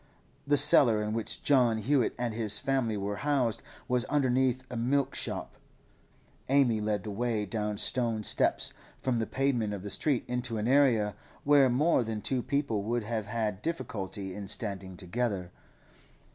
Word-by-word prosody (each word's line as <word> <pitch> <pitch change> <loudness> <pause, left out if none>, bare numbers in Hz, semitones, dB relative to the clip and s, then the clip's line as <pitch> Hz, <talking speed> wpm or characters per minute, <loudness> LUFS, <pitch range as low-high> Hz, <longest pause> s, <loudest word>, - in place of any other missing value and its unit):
The 145 0 +3
cellar 120 -6 +7
in 105 0 -3
which 115 -1 -3
John 125 -5 +3
Hewett 125 +3 0
and 120 -2 -2
his 110 -2 +3
family 125 -4 0
were 100 +1 -3
housed 135 -4 0 0.3
was 125 -1 0
underneath 130 -2 +1
a - - -5
milk 130 +4 0
shop; - - -5 0.9
Amy 130 -5 +3
led 105 -2 -2
the 105 - -6
way 110 0 -2
down 105 0 -3
stone 115 -1 0
steps - - +1 0.3
from 125 -3 -1
the 110 - -2
pavement 125 -6 -1
of 95 - -9
the 100 - -5
street 140 -5 +1
into 125 -2 -2
an 105 +1 -2
area, 125 -6 +3 0.3
where 140 -2 +5
more 135 +2 +2
than 110 -1 -4
two 130 +4 -1
people 140 -6 -1
would 115 +3 -2
have 110 -1 -4
had 105 -3 -3
difficulty 100 - -5
in 100 0 -7
standing 95 -3 -3
together. 95 -2 -3
115 Hz, 160 wpm, -29 LUFS, 105-130 Hz, 0.9 s, cellar